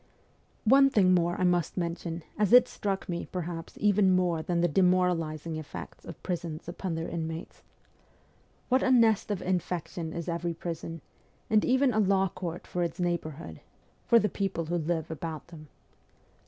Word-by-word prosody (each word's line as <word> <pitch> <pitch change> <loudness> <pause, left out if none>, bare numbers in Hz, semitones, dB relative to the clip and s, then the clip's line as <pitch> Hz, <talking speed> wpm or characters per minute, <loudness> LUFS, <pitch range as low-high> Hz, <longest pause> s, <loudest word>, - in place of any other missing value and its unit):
One 275 +4 +6
thing 190 -7 +4
more 175 -1 +1
I - - +1
must 175 -2 +1
mention 170 -1 -3
as 210 -2 +1
it 250 0 +8
struck 195 -5 -3
me, 170 -1 -4
perhaps, 170 -2 -5
even 205 -2 +4
more 175 -3 +1
than 170 +1 -1
the 175 - +4
demoralising 170 -3 +1
effects 90 - -9
of - - -10
prisons 170 -3 -4
upon 175 0 -4
their 165 +1 -3
inmates. 165 -1 -5 1.1
What 260 +1 +3
a - - +2
nest 230 -5 +4
of 200 -3 -2
infection 175 -2 -2
is 170 +1 -5
every 170 0 -2
prison, 165 -1 -6 0.5
and 215 -1 +4
even 260 0 +3
a 215 - +2
law 195 -2 +3
court 170 -1 -6
for 180 - -3
its 170 0 -2
neighbour 175 -2 -1
hood 165 - -9 0.5
for 235 - +6
the 210 - +3
people 195 -5 -2
who 175 +2 -1
live 160 0 -2
about 160 0 -6
them. 155 -3 -12
175 Hz, 170 wpm, -29 LUFS, 165-195 Hz, 1.1 s, it